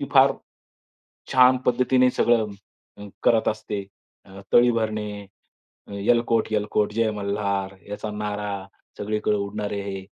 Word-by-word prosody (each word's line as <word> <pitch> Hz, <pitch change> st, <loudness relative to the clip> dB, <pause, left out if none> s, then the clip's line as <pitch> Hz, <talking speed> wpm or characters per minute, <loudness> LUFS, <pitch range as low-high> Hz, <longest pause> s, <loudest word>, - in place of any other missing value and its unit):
ती -, -, -2 dB
फार -, -, +6 dB, 1.0 s
छान 130 Hz, 0 st, +6 dB
पद्धतीने 125 Hz, +1 st, +3 dB
सगळं 120 Hz, -3 st, +2 dB, 0.8 s
करत 115 Hz, -1 st, +3 dB
असते. 105 Hz, -2 st, -3 dB, 0.7 s
तळी 120 Hz, 0 st, +6 dB
भरणे, 105 Hz, -2 st, -3 dB, 0.8 s
एलकोट-एलकोट 110 Hz, -3 st, +1 dB
जय 115 Hz, 0 st, +1 dB
मल्हार, 100 Hz, -1 st, -2 dB
याचा 105 Hz, +1 st, -5 dB
नारा 105 Hz, -2 st, -4 dB, 0.3 s
सगळीकडे 105 Hz, 0 st, 0 dB
उडणारे 100 Hz, 0 st, -3 dB
हे 95 Hz, -1 st, -6 dB
105 Hz, 100 wpm, -24 LUFS, 100-115 Hz, 1.0 s, फार